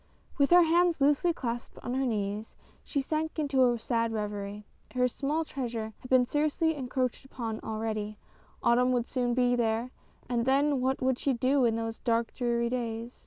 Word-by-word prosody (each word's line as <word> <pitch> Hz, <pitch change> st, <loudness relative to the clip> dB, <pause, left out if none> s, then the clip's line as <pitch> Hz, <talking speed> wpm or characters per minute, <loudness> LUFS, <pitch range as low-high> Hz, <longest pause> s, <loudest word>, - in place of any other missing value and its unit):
With 280 Hz, -, +4 dB
her 355 Hz, 0 st, +8 dB
hands 340 Hz, 0 st, +3 dB
loosely 290 Hz, +5 st, +3 dB
clasped 240 Hz, -6 st, -5 dB
on 245 Hz, -, -3 dB
her 265 Hz, 0 st, 0 dB
knees, 210 Hz, -1 st, -3 dB, 0.3 s
she 280 Hz, -, -1 dB
sank 310 Hz, +3 st, -2 dB
into 270 Hz, -5 st, +3 dB
a 240 Hz, -, -1 dB
sad 230 Hz, 0 st, 0 dB
reverie. 205 Hz, -1 st, -4 dB, 0.3 s
Her 250 Hz, 0 st, +3 dB
small 290 Hz, +6 st, -2 dB
treasure 235 Hz, -6 st, -4 dB
had 255 Hz, -, -12 dB
been 255 Hz, -1 st, +5 dB
seriously 305 Hz, +4 st, +1 dB
encroached 255 Hz, -3 st, -2 dB
upon 230 Hz, -4 st, -5 dB
already; 215 Hz, -1 st, -3 dB, 0.5 s
autumn 250 Hz, +2 st, +4 dB
would 240 Hz, -2 st, +1 dB
soon 245 Hz, -2 st, -1 dB
be 245 Hz, -1 st, +3 dB
there, 230 Hz, +1 st, 0 dB, 0.4 s
and 235 Hz, -1 st, 0 dB
then 280 Hz, 0 st, +3 dB
what 260 Hz, 0 st, 0 dB
would 260 Hz, -1 st, +1 dB
she 275 Hz, -, +1 dB
do 255 Hz, +2 st, +2 dB
in 225 Hz, -1 st, +2 dB
those 225 Hz, 0 st, -3 dB
dark, 230 Hz, 0 st, 0 dB
dreary 235 Hz, -1 st, 0 dB
days. 235 Hz, -1 st, -4 dB
245 Hz, 175 wpm, -29 LUFS, 230-275 Hz, 0.5 s, her